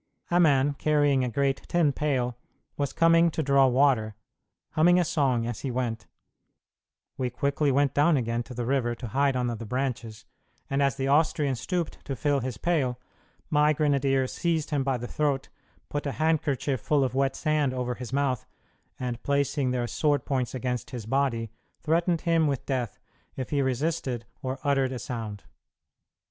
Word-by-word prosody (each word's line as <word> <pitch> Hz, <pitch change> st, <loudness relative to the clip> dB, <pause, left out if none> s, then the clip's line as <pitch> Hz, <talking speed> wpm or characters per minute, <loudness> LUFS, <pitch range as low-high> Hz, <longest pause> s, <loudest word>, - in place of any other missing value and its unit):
A 175 Hz, -, +4 dB
man, 145 Hz, -4 st, +4 dB
carrying 145 Hz, -2 st, +2 dB
a 125 Hz, -, 0 dB
great 135 Hz, +3 st, 0 dB
tin 170 Hz, -4 st, +3 dB
pail, 130 Hz, -4 st, -1 dB, 0.4 s
was 140 Hz, -2 st, -1 dB
coming 165 Hz, 0 st, +4 dB
to 160 Hz, 0 st, -2 dB
draw 140 Hz, -1 st, +5 dB
water, 125 Hz, -5 st, +2 dB, 0.6 s
humming 175 Hz, +3 st, +4 dB
a 175 Hz, -, +2 dB
song 135 Hz, -8 st, +1 dB
as 120 Hz, -3 st, -4 dB
he 135 Hz, -, -4 dB
went; 120 Hz, -5 st, -3 dB, 1.1 s
we 125 Hz, -1 st, 0 dB
quickly 140 Hz, +3 st, 0 dB
went 140 Hz, 0 st, +2 dB
down 150 Hz, +2 st, +4 dB
again 115 Hz, -1 st, -1 dB
to 125 Hz, -, -9 dB
the 120 Hz, 0 st, -3 dB
river 120 Hz, -2 st, 0 dB
to 120 Hz, -1 st, -7 dB
hide 140 Hz, +3 st, +2 dB
under 125 Hz, -1 st, 0 dB
the 115 Hz, 0 st, -6 dB
branches, 120 Hz, -3 st, -3 dB, 0.5 s
and 135 Hz, +1 st, +1 dB
as 140 Hz, -3 st, +2 dB
the 135 Hz, -, -2 dB
Austrian 145 Hz, -1 st, +2 dB
stooped 170 Hz, +6 st, -3 dB
to 135 Hz, -, -3 dB
fill 145 Hz, +2 st, +1 dB
his 125 Hz, -3 st, -4 dB
pail, 135 Hz, -7 st, 0 dB, 0.5 s
my 150 Hz, 0 st, +4 dB
grenadiers 140 Hz, -3 st, +1 dB
seized 165 Hz, -2 st, -1 dB
him 145 Hz, -2 st, +1 dB
by 135 Hz, -1 st, 0 dB
the 120 Hz, -, -6 dB
throat, 140 Hz, 0 st, -1 dB, 0.4 s
put 145 Hz, 0 st, -3 dB
a 140 Hz, -, -2 dB
handkerchief 150 Hz, -5 st, 0 dB
full 145 Hz, +2 st, +2 dB
of 130 Hz, -, -1 dB
wet 135 Hz, 0 st, +1 dB
sand 155 Hz, -4 st, +1 dB
over 125 Hz, -1 st, -2 dB
his 125 Hz, -1 st, -8 dB
mouth, 135 Hz, -3 st, 0 dB, 0.5 s
and 125 Hz, -1 st, -3 dB
placing 140 Hz, -1 st, 0 dB
their 125 Hz, -1 st, 0 dB
sword 145 Hz, +5 st, 0 dB
points 130 Hz, -3 st, -1 dB
against 125 Hz, -2 st, -3 dB
his 120 Hz, -4 st, -6 dB
body, 115 Hz, -3 st, 0 dB, 0.3 s
threatened 170 Hz, +1 st, +1 dB
him 165 Hz, -2 st, +2 dB
with 140 Hz, -3 st, -2 dB
death 125 Hz, -5 st, -2 dB, 0.4 s
if 130 Hz, -, -5 dB
he 145 Hz, -1 st, +2 dB
resisted 130 Hz, -2 st, -1 dB, 0.2 s
or 130 Hz, 0 st, -3 dB
uttered 135 Hz, -3 st, +2 dB
a 130 Hz, -, -3 dB
sound. 110 Hz, -4 st, -6 dB
135 Hz, 175 wpm, -27 LUFS, 125-150 Hz, 1.1 s, draw